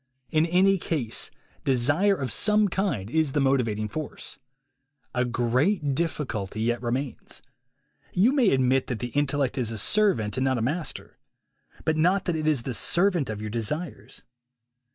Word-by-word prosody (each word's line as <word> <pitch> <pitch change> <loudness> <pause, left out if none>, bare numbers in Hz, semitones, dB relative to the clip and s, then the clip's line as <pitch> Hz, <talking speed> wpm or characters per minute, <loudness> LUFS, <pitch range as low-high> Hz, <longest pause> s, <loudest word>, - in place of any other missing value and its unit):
In 155 +1 +3
any 190 +3 +3
case, 140 -10 -1 0.3
desire 145 +10 +3
of 130 - -3
some 210 - +3
kind 180 - -1
is 155 +2 0
the 145 - +1
motivating 120 -6 +1
force. 155 +7 -7 0.7
A 125 - +1
great 130 - +1
difficulty 130 - -3
yet 120 +2 0
remains. 125 +2 -4 0.7
You 205 +8 +3
may 255 -8 +4
admit 130 0 +2
that 125 - -3
the 120 +2 -4
intellect 145 0 0
is 120 -3 -1
a 110 - -4
servant 130 - +1
and - - +1
not 130 -1 +1
a - - -2
master. 155 +7 -4 0.7
But 160 0 +1
not 180 +5 +2
that 175 - 0
it 155 -1 -2
is 145 -6 +2
the 130 - -3
servant 175 - +2
of 105 -1 -4
your 110 -1 -5
desires. 140 +9 -4
140 Hz, 155 wpm, -26 LUFS, 120-170 Hz, 0.7 s, may